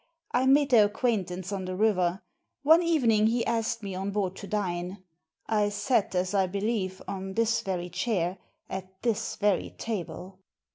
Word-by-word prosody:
I 255 +1 +2
made 280 +1 +4
their 215 -4 +7
acquaintance 195 -5 -2
on 195 -2 -3
the 185 0 -4
river. 185 -3 +1 0.4
One 320 +4 +7
evening 240 -11 +3
he 230 +1 +1
asked 230 -1 -1
me 195 -1 -4
on 190 +2 -3
board 195 -2 -1
to 200 - -8
dine. 185 -2 -3 0.4
I 210 -2 +1
sat, 205 0 0
as 185 +2 0
I 195 -2 +3
believe, 200 -1 -2
on 190 0 -5
this 230 0 +2
very 180 -2 -3
chair, 185 -1 -1 0.3
at 190 0 -7
this 230 -4 0
very 205 -3 0
table. 190 -3 -5
200 Hz, 160 wpm, -28 LUFS, 185-225 Hz, 0.4 s, their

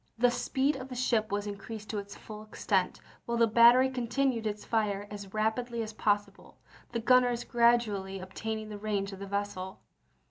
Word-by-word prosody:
The 245 +1 +4
speed 270 +3 0
of 260 0 -8
the 250 - -6
ship 230 -3 +1
was 205 0 -1
increased 210 +1 -7
to 210 - -2
its 200 0 -9
full 215 -1 -10
extent, 200 -3 -1 0.3
while 235 0 0
the 230 - +5
battery 235 +3 +7
continued 250 -2 0
its 210 0 -4
fire 205 -3 0
as 200 -2 -8
rapidly 225 +2 -1
as 215 0 -7
possible, 205 -1 -1 0.3
the 235 - -1
gunners 245 0 +3
gradually 230 -5 +2
ob 185 0 -10
taining 220 -1 -4
the 210 -1 -7
range 200 -2 -2
of 190 - -9
the 200 - -6
vessel. 200 -2 -4
220 Hz, 180 wpm, -30 LUFS, 205-240 Hz, 0.3 s, battery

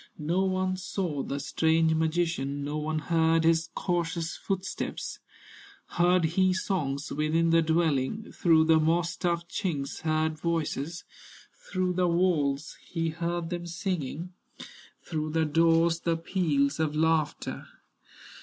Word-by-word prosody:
No 170 +5 0
one 185 0 0
saw 180 -5 -3
the 140 +1 -3
strange 160 +2 +2
magician, 160 -3 0
No 145 +2 -3
one 155 +1 -2
heard 165 0 +2
his 165 0 +2
cautious 170 -2 -1
footsteps; 190 -1 -4 0.7
Heard 175 0 +3
he 185 +3 +2
songs 150 -8 -2
within 160 +2 +1
the 165 0 +5
dwelling, 160 +4 0
Through 160 -2 +4
the 160 0 +5
moss 165 +2 +2
stuffed 170 -2 -2
chinks 150 -8 -3
heard 155 0 0
voices, 165 -1 -2 0.5
Through 185 -1 -2
the 180 0 +2
walls 160 -5 +1
he 165 -1 -2
heard 170 +1 -3
them 175 0 -4
singing, 170 -1 -4 0.7
Through 155 -2 -3
the 160 -1 +2
doors 165 +2 +3
the 170 -1 0
peals 155 -5 0
of 155 -1 0
laughter. 160 -1 0
165 Hz, 125 wpm, -28 LUFS, 155-175 Hz, 0.7 s, the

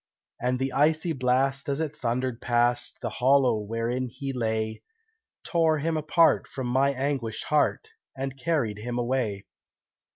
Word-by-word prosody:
And 125 +1 +1
the 130 0 -2
icy 160 +3 +2
blast, 135 +2 +1
as 140 +1 0
it 155 -2 -2
thundered 125 -2 -2
past 120 0 +1
The - - -1
hollow 130 -3 +4
wherein 115 +4 -2
he 135 +3 -5
lay, 110 -2 -2 0.6
Tore 165 -2 +2
him 160 +2 -1
apart 155 +2 +3
from 130 - -5
my 135 +3 +2
anguished 130 -4 -2
heart, 150 - +1 0.3
And 135 0 -3
carried 135 -8 -1
him 120 +2 -4
away. 120 -5 -1
130 Hz, 140 wpm, -27 LUFS, 120-140 Hz, 0.6 s, hollow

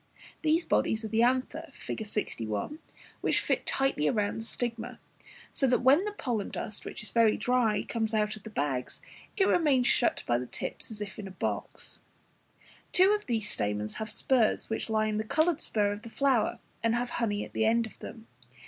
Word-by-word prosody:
These 320 +2 +2
bodies 220 0 +1
are - - -4
the 225 +1 +2
anthers, 260 +6 +1
Fig. 220 - -5
61, 115 - -3 0.4
which - - +3
fit - - -1
tightly 270 - +2
round 210 0 0
the - - -8
stigma, 235 0 -3 0.5
so 270 - +2
that 250 0 +2
when 285 +9 +5
the 420 - -2
pollen 240 - -2
dust, 210 - -5
which - - -6
is 210 - -5
very 230 -2 +4
dry, 230 -2 +2
comes 225 -1 -1
out 210 0 +1
of 215 - -12
the 220 - -9
bags, 140 - -2 0.4
it 390 - +4
remains 280 -7 +3
shut 240 - +3
in - - -19
by 120 0 +2
the 125 - -5
tips - - -4
as 215 -2 -6
if 205 0 -6
in 200 - -5
a 185 -1 -12
box. - - -4 0.9
Two 375 +2 +6
of 420 0 0
these 225 -4 0
stamens 105 - -1
have 220 0 -4
spurs 225 0 +2
which 220 - -2
lie 215 -1 +2
in 215 -1 -1
the 215 - 0
coloured 315 +7 +1
spur 205 -2 +1
of 205 +1 -5
the 230 - -9
flower, 265 -2 +2 0.2
and 230 0 +2
have 245 0 -1
honey 205 -3 0
at - - -15
the 220 - +1
end 230 +1 +3
of 220 - -12
them. 225 -1 -9
225 Hz, 200 wpm, -29 LUFS, 210-255 Hz, 0.9 s, Two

